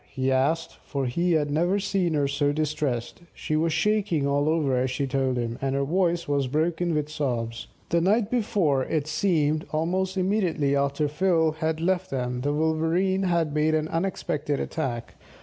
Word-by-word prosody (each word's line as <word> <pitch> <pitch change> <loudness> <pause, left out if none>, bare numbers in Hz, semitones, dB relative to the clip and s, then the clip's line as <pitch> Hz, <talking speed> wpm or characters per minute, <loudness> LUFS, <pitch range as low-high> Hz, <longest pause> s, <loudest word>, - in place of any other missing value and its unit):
he 130 0 -1
asked, 145 +6 0
for 140 -3 -3
he 170 +8 +1
had 150 -2 +1
never 175 +6 +2
seen 190 -4 0
her 145 -1 +2
so 145 +1 +1
distressed. 150 -4 -2
She 155 - -2
was 165 +1 +1
shaking 185 -3 +1
all 145 +2 +1
over 155 -5 +1
as 125 +1 +1
she 140 +2 -1
told 130 -1 0
him, 120 -1 -3
and 135 0 -1
her 140 - +1
voice 170 +2 0
was 140 -2 +1
broken 160 +4 0
with 150 -1 0
sobs. 120 -6 -3 0.2
The 170 - +2
night 205 +4 +2
before, 200 - +1
it 155 -3 -1
seemed, 155 -2 +1
almost 185 +4 -1
immediately 180 -7 +1
after 140 +2 +1
Phil 160 +1 +2
had 160 0 -2
left 185 +2 0
them, 125 -2 -2
the 145 +2 0
Wolverene 160 +5 +1
had 165 -4 +1
made 155 +1 +2
an 155 0 0
unexpected 155 -5 -2
attack. 125 -7 -4
155 Hz, 175 wpm, -26 LUFS, 140-175 Hz, 0.2 s, never